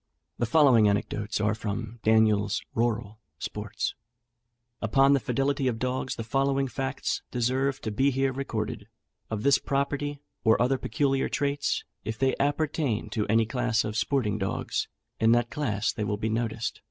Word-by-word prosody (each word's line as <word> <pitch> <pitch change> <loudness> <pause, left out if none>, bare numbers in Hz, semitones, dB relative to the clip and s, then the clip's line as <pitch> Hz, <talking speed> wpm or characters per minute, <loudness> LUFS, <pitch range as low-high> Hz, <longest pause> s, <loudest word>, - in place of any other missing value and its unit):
The 120 - +1
following 125 -7 +6
anecdotes 105 +1 -1
are 105 0 +2
from 110 +2 -4
Daniel's 110 -2 +3
"Rural 115 -2 -1 0.2
Sports:" 105 +5 -3 0.9
Upon 135 +5 +4
the 140 - +4
fidelity 135 +1 0
of 120 -3 0
dogs, 130 +2 -2
the 115 - -4
following 135 +3 +1
facts 135 +1 -2
deserve 130 +3 0
to 110 - -3
be 135 +7 +2
here 135 0 +1
recorded: 110 -5 -4 0.4
of 110 -2 -3
this 140 0 +5
property, 145 +1 -1 0.2
or 110 -1 +4
other 130 +2 +2
peculiar 135 -3 0
traits, 145 0 0 0.2
if 110 +1 -4
they 135 +1 +2
appertain 145 -6 0
to 105 -1 -1
any 115 +1 +3
class 120 0 0
of 105 0 -4
sporting 115 -3 0
dogs, 95 -1 -2 0.3
in 115 +1 +5
that 120 0 +1
class 110 -9 -1
they 110 - -3
will 105 0 -1
be 110 +1 -2
noticed. 115 0 -2
120 Hz, 155 wpm, -27 LUFS, 110-135 Hz, 0.9 s, following